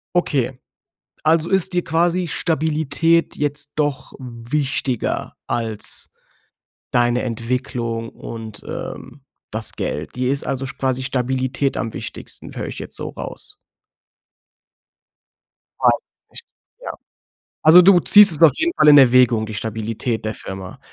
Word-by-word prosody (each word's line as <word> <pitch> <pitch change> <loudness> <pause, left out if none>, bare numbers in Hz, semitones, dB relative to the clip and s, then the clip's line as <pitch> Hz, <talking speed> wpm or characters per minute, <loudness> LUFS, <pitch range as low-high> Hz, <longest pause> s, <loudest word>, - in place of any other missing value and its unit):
Okay. 135 -7 0 0.7
Also 160 +1 +2
ist 190 -1 +2
dir 175 -1 -1
quasi 175 +2 0
Stabilität 160 0 0
jetzt 145 0 -3
doch 145 -3 -2
wichtiger 130 +1 -3
als 115 -3 0 0.8
deine 120 0 +1
Entwicklung 115 -1 -4
und, 110 -2 -10
ähm, 135 +1 -8 0.3
das 110 0 0
Geld. 75 - -5
Dir 125 0 -1
ist 140 - -3
also 135 0 -3
sch 130 - -8
quasi 130 -1 -1
Stabilität 130 +1 -2
am 115 -2 -4
wichtigsten. - - -8
Höre - - -5
ich - - -8
jetzt - - -5
so - - -4
raus. - - -9 2.3
Ja, - - +4 0.4
ich - - -9 0.4
Ja. - - -5 0.7
Also, 160 +3 +8
du 180 0 +6
ziehst 205 +3 +9
es 155 - +3
auf 165 -3 +8
jeden 335 +1 0
Fall - - +3
in 145 -1 +8
Erwägung, 125 -4 +5
die 110 - -8
Stabilität 110 +2 -4
der 110 - -2
Firma. 95 -2 -9
130 Hz, 130 wpm, -20 LUFS, 115-155 Hz, 2.3 s, ziehst